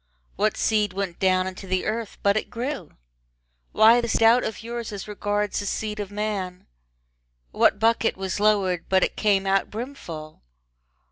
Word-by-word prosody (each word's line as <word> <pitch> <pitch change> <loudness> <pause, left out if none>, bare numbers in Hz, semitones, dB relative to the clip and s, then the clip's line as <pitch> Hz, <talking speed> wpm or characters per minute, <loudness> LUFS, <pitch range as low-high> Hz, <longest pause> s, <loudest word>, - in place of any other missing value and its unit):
What 210 +2 0
seed 210 -3 +1
went 195 -3 -4
down 185 -1 +3
into 190 +1 -7
the 185 0 -1
earth 220 0 -3
but 200 0 +3
it 215 - -2
grew? 245 - -5 0.8
Why 230 +2 +6
this 235 -1 -2
doubt 230 +2 +5
of 220 - -5
yours 235 -1 -5
as 200 -1 -7
regards 205 0 -1
the 205 - -4
seed 210 +1 -3
of 205 -2 -4
man? 205 -3 -4 0.9
What 210 - +3
bucket 225 0 +2
was 190 +1 -3
lowered 200 -5 +2
but 190 -1 +4
it - - -1
came 200 -2 +2
out 195 0 +1
brimful? 175 - -8
205 Hz, 160 wpm, -24 LUFS, 190-220 Hz, 0.9 s, Why